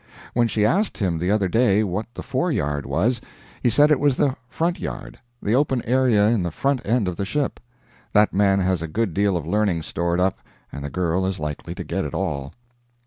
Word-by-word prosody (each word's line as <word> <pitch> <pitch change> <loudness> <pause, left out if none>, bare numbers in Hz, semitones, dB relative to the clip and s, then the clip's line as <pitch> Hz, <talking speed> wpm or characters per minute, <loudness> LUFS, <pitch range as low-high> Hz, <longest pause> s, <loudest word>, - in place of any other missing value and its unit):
When 120 -1 +3
she 105 -2 +1
asked 195 - +1
him 90 -6 0
the 90 +2 -1
other 100 -2 +2
day 110 0 +3
what 105 +3 -2
the - - -6
fore 135 +8 -1
yard 75 - -1
was, 115 +8 +1 0.4
he 120 - +3
said 145 +6 +5
it 150 - +4
was 145 -2 +3
the 135 -1 +1
front 170 +6 -1
yard, - - -6 0.2
the 105 - +1
open 130 -2 +2
area 120 -4 +3
in 115 -4 +2
the 85 - -1
front 135 - -1
end 115 -2 +1
of 90 -2 -3
the - - -1
ship. 140 +8 -2 0.5
That 105 0 +4
man 100 0 +3
has 90 -2 +1
a 80 - -3
good 100 +2 -1
deal 100 0 +2
of 80 - -5
learning 95 -2 0
stored 85 +2 -1
up, 95 +1 +1 0.3
and 70 - -7
the 70 - -4
girl 90 +2 0
is 95 0 -2
likely 75 -2 -5
to - - -5
get - - -2
it - - -5
all. 70 0 -2
105 Hz, 220 wpm, -23 LUFS, 90-125 Hz, 0.5 s, said